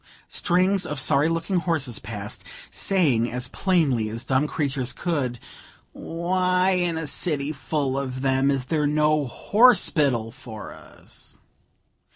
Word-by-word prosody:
Strings 185 +2 +2
of 150 -2 -3
sorry 140 +3 +3
looking 165 +3 -1
horses 160 -9 -1
passed, 105 -1 -6 0.3
saying 140 - +1
as 125 +1 -2
plainly 145 - +1
as 115 +2 -6
dumb 135 +3 +1
creatures 135 -5 -2
could, 140 -8 -2 0.6
"Why, 180 +2 0
in 175 -3 0
a 160 - -3
city 150 -2 -1
full 140 -2 -2
of 130 -1 -5
them, 135 0 +2
is 135 -2 0
there 150 +1 0
no 150 -1 +2
_horse_pital 150 - +3
for 115 -5 -9
us?" - - -12
145 Hz, 130 wpm, -24 LUFS, 130-170 Hz, 0.6 s, sorry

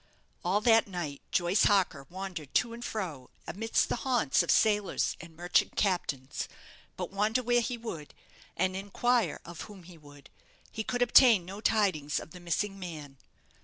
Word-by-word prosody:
All 190 +4 +1
that 225 -1 +5
night 170 -7 -5
Joyce 175 +3 +3
Harker 180 -9 +2
wandered 180 -6 -7
to 235 -2 +2
and 235 +1 -8
fro 165 - -5 0.2
amidst 225 +4 0
the - - -1
haunts 240 - +2
of 170 - -4
sailors 210 -2 +2
and 165 -2 -13
merchant 175 +2 +1
captains; 145 -9 -1 0.5
but - - -4
wander 215 +5 +1
where 240 0 +3
he 240 +1 -3
would, 170 -11 -7 0.4
and 185 +2 +1
inquire 205 0 0
of 170 0 -9
whom 195 -3 -12
he 170 -1 -14
would, 145 -2 -16 0.4
he 220 - -4
could 245 +2 0
obtain 235 -6 +6
no 195 +3 -8
tidings 185 -11 +1
of - - -11
the 180 - -10
missing 195 +3 -2
man. 150 -7 -8
190 Hz, 165 wpm, -30 LUFS, 165-220 Hz, 0.5 s, obtain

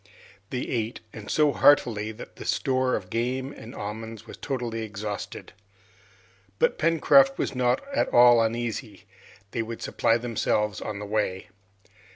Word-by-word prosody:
They 125 - -3
ate, 115 -2 -3
and 110 -2 -9
so 150 -2 +3
heartily, 110 -8 +3
that 110 - -11
the - - -8
store 130 -1 +1
of 90 -1 -6
game 130 +4 -1
and 115 -3 -11
almonds 110 +1 -6
was - - -10
totally 120 -4 -3
exhausted. 105 -1 -6 1.0
But - - +1
Pencroft 270 - +5
was - - -2
not 125 -1 +1
at - - +1
all 120 -1 +7
uneasy, 115 -3 -3 0.5
they 115 - -1
would 115 0 -6
supply 115 - +2
themselves 105 -3 -1
on 105 - -4
the 105 - -6
way. 100 -3 -2
115 Hz, 145 wpm, -26 LUFS, 105-125 Hz, 1.0 s, all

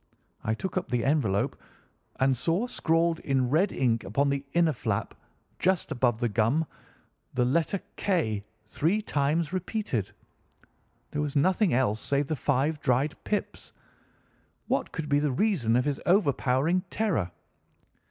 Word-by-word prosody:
I 110 - 0
took 190 +8 -4
up 185 - -2
the 120 -2 0
envelope 120 -9 +1 0.6
and 130 0 +3
saw 165 - 0
scrawled 165 -7 +1
in 130 -2 0
red 180 +7 +3
ink 115 -3 +1
upon 140 +9 +1
the 140 0 -1
inner 170 -2 +3
flap, 110 -5 -2 0.5
just 185 -2 +1
above 120 -3 +1
the 120 - +1
gum, 115 +9 +1 0.7
the 125 - +3
letter 165 +9 +1 0.2
K 110 - 0 0.2
three 170 - 0
times 150 +1 0
repeated. 185 - -2 1.0
There 150 - -1
was 150 -1 -3
nothing 185 +5 +3
else 110 -4 +1
save 140 +1 0
the 155 - -2
five 145 +2 0
dried 135 +4 +1
pips. 210 - -3 0.9
What - - -1
could 160 -2 -4
be 145 0 +3
the 145 -1 +1
reason 130 - +1
of 125 +1 +2
his 145 -2 -1
overpowering 165 -2 +2
terror? 180 - 0
145 Hz, 145 wpm, -28 LUFS, 125-170 Hz, 1.0 s, and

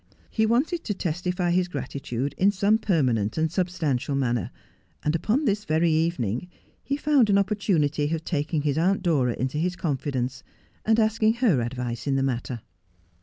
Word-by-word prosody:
He 220 -1 +2
wanted 290 +9 +1
to 205 - -2
testify 180 +1 -1
his 180 0 +1
grati 140 -3 -5
tude 130 +3 -3
in 195 - +4
some 205 +2 +2
permanent 125 - +1
and 160 0 +1
substantial 165 -7 -1
manner; 120 -4 0 0.5
and 150 - +1
upon 225 - +1
this 210 -2 +1
very 165 -2 +2
evening 155 - 0 0.3
he 280 - -2
found 290 -6 +3
an 200 - +5
opportunity 170 -8 +1
of 165 -1 -2
taking 150 -1 -1
his 150 0 +1
aunt 190 +3 +2
Dora 140 -9 +2
into 130 +4 -2
his 180 +2 0
confidence, 135 -6 -2 0.4
and 220 +1 +3
asking 220 0 +3
her 225 - +2
advice 120 0 -4
in 135 - +2
the 135 - +1
matter. 125 -2 -2
165 Hz, 170 wpm, -25 LUFS, 135-200 Hz, 0.5 s, an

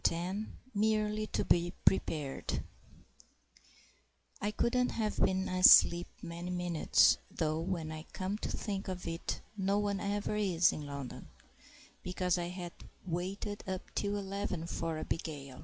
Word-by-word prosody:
VIII 185 +6 -2 0.3
Merely 215 0 +1
to - - -1
be 175 +1 +2
Prepared 150 -7 0 1.8
I 205 - +1
COULDN'T 245 +4 +1
have 215 -2 -1
been 190 0 +2
asleep 175 -1 +7 0.2
many 170 +1 -5
minutes 175 -3 +4
(though, 155 -1 -1
when 165 -2 -2
I 155 +1 -7
come 195 +3 -3
to - - -3
think 200 -2 -3
of 185 -2 -4
it, 165 0 -3
no 200 0 +1
one 205 -1 0
ever 205 0 -1
is, 180 -5 +3
in 150 -1 -6
London), 140 -3 -7 0.7
because 180 -1 0
I 170 - -2
had 175 -1 -6 0.3
waited 190 +4 -3
up 185 -1 -5
till 205 0 -1
eleven 195 -4 -3
for 165 -1 -3
Abigail. 145 -4 -4
185 Hz, 135 wpm, -33 LUFS, 170-205 Hz, 1.8 s, asleep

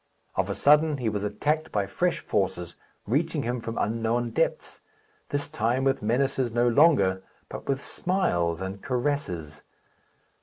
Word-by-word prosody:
Of 95 +1 -1
a 100 - -2
sudden 150 +1 +4
he 120 -4 -1
was 105 -1 -3
attacked 150 +10 -1
by 100 -2 0
fresh 175 - 0
forces, 90 -4 -2 0.3
reaching - - 0
him 120 +1 -2
from 115 0 -5
unknown 115 +2 0
depths; - - -1 0.5
this 145 0 -2
time, 120 +4 0
with 135 0 +1
menaces 125 +3 0
no 120 +1 +2
longer, 115 - +4 0.3
but - - -8
with 135 0 0
smiles 85 - 0
and 95 +1 -5
caresses. 110 - -2
115 Hz, 145 wpm, -26 LUFS, 100-140 Hz, 0.5 s, sudden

